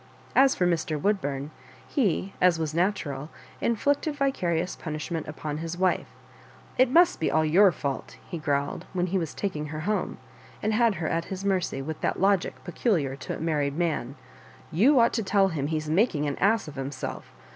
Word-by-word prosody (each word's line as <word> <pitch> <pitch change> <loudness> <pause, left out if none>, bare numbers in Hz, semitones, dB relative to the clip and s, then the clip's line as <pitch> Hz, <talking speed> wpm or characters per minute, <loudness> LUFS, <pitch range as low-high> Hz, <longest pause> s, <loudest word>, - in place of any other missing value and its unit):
As 270 0 +6
for 180 - +1
Mr. 160 -3 0
Woodburn, 145 -7 -1 0.4
he, 195 - 0
as 180 -2 +5
was 160 -2 -2
natural, 160 -6 -1 0.3
inflicted 285 +6 +1
vica 275 -9 0
rious 170 +2 0
punishment 155 0 -4
upon 150 0 -5
his 165 +1 -4
wife. 185 0 +1 0.4
" - - -24
It 255 -1 +6
must 340 +6 +5
be 160 - +1
all 160 0 +2
your 185 +5 +6
fault," 140 -4 -4
he 170 - -5
growled, 145 -2 -1
when 180 -1 +1
he 185 +1 0
was 165 -3 -4
taking 155 -7 -3
her 155 +1 -5
home, 205 +2 -1 0.5
and 215 +1 +1
had 225 -1 +3
her 160 -2 -2
at 165 0 -1
his 190 0 -6
mercy, 185 -8 0
with 155 +2 -5
that - - 0
logic 195 -1 +2
peculiar 165 - 0
to - - -5
a - - -10
married 150 -3 0
man; 155 -7 -1 0.6
you 245 - +5
ought 235 0 +4
to 225 - 0
teU 195 0 +3
him 145 -5 -2
he's 155 0 -2
making 160 -2 +2
an 145 -1 -1
ass 205 0 +2
of 145 - -9
himself. 135 +1 -5
170 Hz, 190 wpm, -27 LUFS, 155-200 Hz, 0.6 s, As